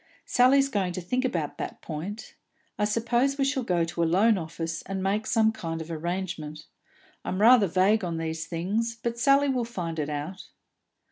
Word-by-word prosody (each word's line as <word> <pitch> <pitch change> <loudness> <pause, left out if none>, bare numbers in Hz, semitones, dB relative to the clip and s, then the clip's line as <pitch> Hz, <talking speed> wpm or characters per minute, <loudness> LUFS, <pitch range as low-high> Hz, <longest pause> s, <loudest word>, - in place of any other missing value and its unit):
"Sally's 270 +2 +4
going 195 -8 -1
to 185 - -3
think 250 +9 -1
about 170 - -2
that - - -5
point. 175 +8 -6 0.5
I 210 - +3
suppose 240 +5 +1
we 275 - +2
shall 275 -1 0
go 180 -7 +1
to 170 +1 -3
a - - +4
loan 200 +7 +4
office, 165 -1 -4
and 190 0 -3
make 205 +3 0
some 220 -2 +3
kind 165 -7 -5
of 160 +1 -7
arrangement. 165 -2 -4 0.6
I'm 185 - -3
rather 225 -1 +6
vague 190 +5 +3
on 170 -2 -2
these 160 0 -3
things, 210 +7 -1
but 235 0 -2
Sally 275 +4 +4
will 255 -3 0
find 175 -8 -4
it 150 0 -2
out." 150 +6 -5
190 Hz, 185 wpm, -27 LUFS, 165-230 Hz, 0.6 s, rather